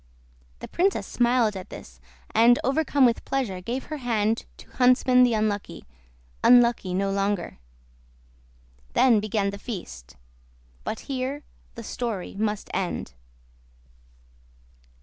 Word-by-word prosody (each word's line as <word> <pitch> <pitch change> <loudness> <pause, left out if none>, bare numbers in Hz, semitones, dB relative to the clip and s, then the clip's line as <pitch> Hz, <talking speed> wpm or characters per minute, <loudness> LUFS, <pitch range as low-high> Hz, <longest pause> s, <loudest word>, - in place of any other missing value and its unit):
The - - -6
princess 385 +3 0
smiled 240 -3 +1
at 185 - -8
this, - - -12 0.3
and 235 +2 +6
overcome 275 0 +2
with 235 -2 +1
pleasure 230 -9 -2
gave 240 +7 -4
her 305 - -6
hand 225 -4 0
to - - -14
Huntsman 250 0 +4
the 245 -2 +4
Unlucky—unlucky 185 - 0
no 195 +1 0
longer. 195 - -2 1.3
Then 240 -5 +5
began 205 -1 -1
the 200 - -8
feast. 65 - -8 0.7
But 220 - -4
here 275 +2 -4 0.3
the 230 - -8
story 220 -5 -4
must 210 0 -2
end. 180 - -3
225 Hz, 110 wpm, -25 LUFS, 195-250 Hz, 1.3 s, and